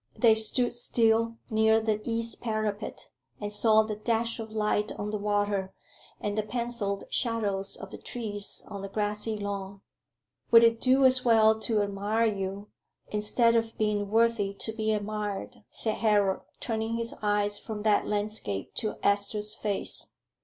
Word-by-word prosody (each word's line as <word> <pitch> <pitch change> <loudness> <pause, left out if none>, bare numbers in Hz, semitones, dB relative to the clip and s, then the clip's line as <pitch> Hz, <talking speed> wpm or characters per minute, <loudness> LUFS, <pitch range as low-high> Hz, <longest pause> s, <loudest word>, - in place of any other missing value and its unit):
They 230 -3 +6
stood 220 +3 +2
still 230 -1 +1
near 220 0 +4
the 215 -1 -1
east 230 0 -2
parapet, 215 -2 -3 0.3
and 205 0 -3
saw 220 0 +5
the 215 -1 -4
dash 230 +1 -1
of 220 -1 -6
light 210 -1 0
on 205 0 -5
the 210 - -2
water, 205 -2 -1 0.4
and 205 0 -3
the 215 - +1
pencilled 215 -2 -3
shadows 205 -5 -1
of - - -10
the - - -9
trees 205 -4 -4
on 200 -1 -7
the 195 - -5
grassy 210 +1 -1
lawn. 200 -1 -5 0.7
"Would 230 0 +8
it 230 0 +3
do 265 +1 +4
as 255 0 +4
well 220 -2 +5
to 220 -2 +1
admire 205 +3 0
you, 200 -1 -3 0.4
instead 215 +3 +3
of 225 0 0
being 210 -2 0
worthy 225 -3 +2
to 220 - -3
be 220 0 -1
admired?" 210 -1 -4
said 220 -2 -1
Harold, 205 -3 +2 0.2
turning 225 0 -2
his 230 0 -3
eyes 205 -1 +1
from 215 -2 -6
that 215 -1 +2
landscape 205 - -2
to 215 -3 -2
Esther's 205 +1 +2
face. 210 -3 -2
215 Hz, 155 wpm, -28 LUFS, 205-225 Hz, 0.7 s, Would